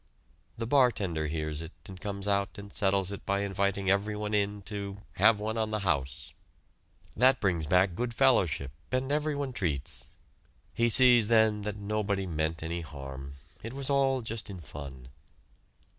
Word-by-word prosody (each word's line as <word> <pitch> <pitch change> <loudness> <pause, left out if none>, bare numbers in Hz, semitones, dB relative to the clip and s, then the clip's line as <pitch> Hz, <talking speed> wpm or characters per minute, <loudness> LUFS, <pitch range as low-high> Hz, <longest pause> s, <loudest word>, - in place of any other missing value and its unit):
The 115 - -3
bartender 105 - +2
hears 75 0 -3
it 80 +1 -9
and 95 -1 -10
comes 100 -1 -4
out 100 -1 0
and 100 0 -10
settles 95 -1 +1
it 100 - -7
by 100 0 0
inviting 100 0 -1
everyone 105 +1 -1
in 105 0 0
to 100 -1 -5 0.2
have 110 -2 +5
"one 110 +2 -2
on 110 -1 0
the 105 -1 -2
house." 70 -8 -2 0.8
That 130 +3 +4
brings 85 -6 0
back 90 +2 +3
good 120 +6 -2
fellowship, 95 - +2 0.2
and 130 +2 -1
everyone 145 -3 -1
treats. 75 - -3 0.7
He 120 0 +2
sees 120 -2 +7
then 110 -2 +4
that 105 0 -4
nobody 100 -1 -1
meant 80 -1 -2
any 85 +1 -3
harm 70 -3 -8 0.3
it 115 +3 -7
was 140 +1 -2
all 135 -2 +2
just 110 -1 -5
in 95 -2 -7
fun. 70 -5 -9
100 Hz, 160 wpm, -29 LUFS, 85-115 Hz, 0.8 s, sees